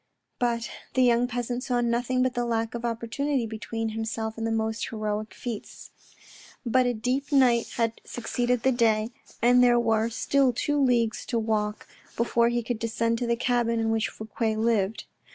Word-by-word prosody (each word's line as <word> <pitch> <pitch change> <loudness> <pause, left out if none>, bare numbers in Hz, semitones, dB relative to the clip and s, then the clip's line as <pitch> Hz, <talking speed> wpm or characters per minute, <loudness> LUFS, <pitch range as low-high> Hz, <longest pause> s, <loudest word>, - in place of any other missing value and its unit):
But 235 -2 0 0.3
the 260 - +4
young 240 0 +4
peasant 245 +1 -3
saw 245 -2 0
nothing 240 +2 +1
but 255 -1 0
the 245 - -1
lack 230 -1 -1
of 235 0 -5
opportunity 240 +3 -1
between 225 +1 -4
himself 220 0 -3
and 225 0 -3
the - - -1
most 220 0 -1
heroic 215 -1 -3
feats. 235 -4 -7 0.7
But 250 +1 +3
a 245 - +1
deep 255 +6 -2
night 250 -4 +4
had 230 -1 -1
succeeded 245 0 -1
the 265 - +4
day, 225 -2 +2 0.3
and 245 +1 +6
there 240 -1 +5
were 225 -1 +2
still 260 +2 +2
two 290 +4 0
leagues 235 -4 +2
to 235 - -1
walk 215 -1 -1 0.3
before 235 0 +2
he 240 0 -1
could 230 0 -3
descend 230 0 0
to 245 - -2
the 235 - +2
cabin 235 -1 +1
in 225 0 +1
which 225 -1 0
Fouque 220 +2 -11 0.2
lived. 220 -2 +1
235 Hz, 175 wpm, -26 LUFS, 225-245 Hz, 0.7 s, and